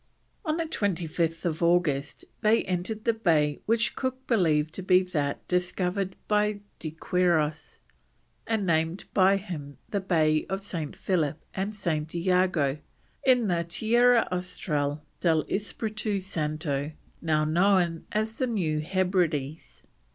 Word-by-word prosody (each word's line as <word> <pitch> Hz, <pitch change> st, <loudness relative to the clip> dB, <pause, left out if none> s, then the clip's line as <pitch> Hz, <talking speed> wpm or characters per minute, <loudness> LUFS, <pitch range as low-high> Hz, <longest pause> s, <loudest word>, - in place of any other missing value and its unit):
On 315 Hz, -3 st, 0 dB
25th 170 Hz, -, -1 dB
August 170 Hz, -5 st, +1 dB, 0.2 s
they 220 Hz, +1 st, +4 dB
entered 185 Hz, +4 st, -3 dB
the 230 Hz, -, +3 dB
bay 155 Hz, -9 st, +2 dB
which 230 Hz, +1 st, +2 dB
Cook 260 Hz, 0 st, -3 dB
believed 160 Hz, -8 st, +2 dB
to -, -, -4 dB
be 185 Hz, 0 st, +4 dB
that 150 Hz, -6 st, -2 dB
discovered 180 Hz, +1 st, -1 dB
by 210 Hz, -1 st, +1 dB, 0.2 s
De 160 Hz, -, -4 dB
Quiros, 160 Hz, -1 st, 0 dB, 0.7 s
and 220 Hz, -3 st, 0 dB
named 165 Hz, +1 st, 0 dB
by 195 Hz, 0 st, +5 dB
him 155 Hz, -8 st, -7 dB
the 200 Hz, -, 0 dB
Bay 155 Hz, -5 st, +2 dB
of 195 Hz, +1 st, -3 dB
St. 165 Hz, -7 st, -4 dB
Philip 155 Hz, -5 st, 0 dB
and 200 Hz, +3 st, -3 dB
St. 160 Hz, -5 st, -2 dB
Iago 175 Hz, -5 st, +2 dB, 0.4 s
in 250 Hz, -4 st, +4 dB
the 170 Hz, -2 st, +1 dB
Tierra 235 Hz, +7 st, +3 dB
Austral 150 Hz, -5 st, -2 dB, 0.2 s
del 160 Hz, -3 st, +2 dB
Espiritu 215 Hz, 0 st, -2 dB
Santo, 155 Hz, -5 st, -2 dB, 0.3 s
now 155 Hz, -2 st, +1 dB
known 175 Hz, 0 st, +2 dB
as 220 Hz, +1 st, -2 dB
the 255 Hz, -, +1 dB
New 170 Hz, -10 st, 0 dB
Hebrides. 170 Hz, -4 st, -1 dB
180 Hz, 125 wpm, -27 LUFS, 155-205 Hz, 0.7 s, by